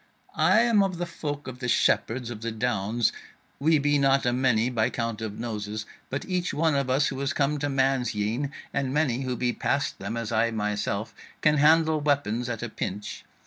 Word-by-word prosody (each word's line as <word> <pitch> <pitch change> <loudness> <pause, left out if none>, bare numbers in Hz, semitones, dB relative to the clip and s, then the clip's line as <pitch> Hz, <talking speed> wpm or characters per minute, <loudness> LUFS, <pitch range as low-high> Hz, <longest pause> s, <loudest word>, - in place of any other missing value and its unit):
"I 220 - +5
am 230 -3 +4
of 190 -3 0
the 175 - -2
folk 150 -4 -5
of 125 -1 -7
the 125 - -3
shepherds 120 0 +1
of 110 -2 -7
the 115 0 -3
Downs: 110 0 0 0.5
we 155 +3 +4
be 145 0 +2
not 135 -1 +3
a 120 - +2
many 125 -3 +2
by 110 -3 +1
count 115 -1 -3
of 110 -2 -5
noses, 105 -2 -4 0.2
but 135 - -3
each 180 -1 -1
one 160 0 +2
of 140 -2 0
us 135 +3 +3
who 135 -1 -5
is 140 +2 0
come 145 0 +1
to 145 +1 -1
man's 135 -3 +1
yean, 115 +7 -1 0.2
and 140 -2 -1
many 135 -4 +1
who 130 -2 -2
be 125 0 0
past 145 +4 -1
them, 100 +4 -4
as 115 -1 -3
I 115 +1 +2
myself, 105 0 -2 0.3
can 150 -1 +4
handle 155 +1 +4
weapons 125 -5 0
at 115 -1 -4
a 120 - -3
pinch. 105 -1 -5
130 Hz, 205 wpm, -26 LUFS, 115-145 Hz, 0.5 s, I